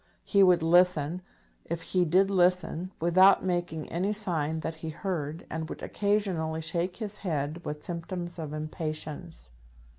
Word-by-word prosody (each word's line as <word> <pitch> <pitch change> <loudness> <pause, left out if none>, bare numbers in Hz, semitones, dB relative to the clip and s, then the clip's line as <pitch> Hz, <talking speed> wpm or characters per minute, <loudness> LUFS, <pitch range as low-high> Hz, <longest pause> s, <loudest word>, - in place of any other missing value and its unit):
He 200 - +3
would 180 -3 +5
listen, 175 -1 +3 0.4
if 170 0 -4
he 180 -1 +1
did 190 +4 +3
listen, 180 -1 +2
without 185 +4 +5
making 175 -3 -2
any 190 +5 0
sign 160 -7 -1
that 160 - -3
he 160 0 -5
heard, 160 -2 -4
and 160 0 -5
would - - -7
occasionally 190 -6 0
shake 170 +3 -1
his 210 -2 -5
head 155 -2 -3
with 150 0 -5
symptoms 175 0 -5
of 155 -2 -5
impatience. 155 - -5
170 Hz, 145 wpm, -28 LUFS, 160-185 Hz, 0.4 s, would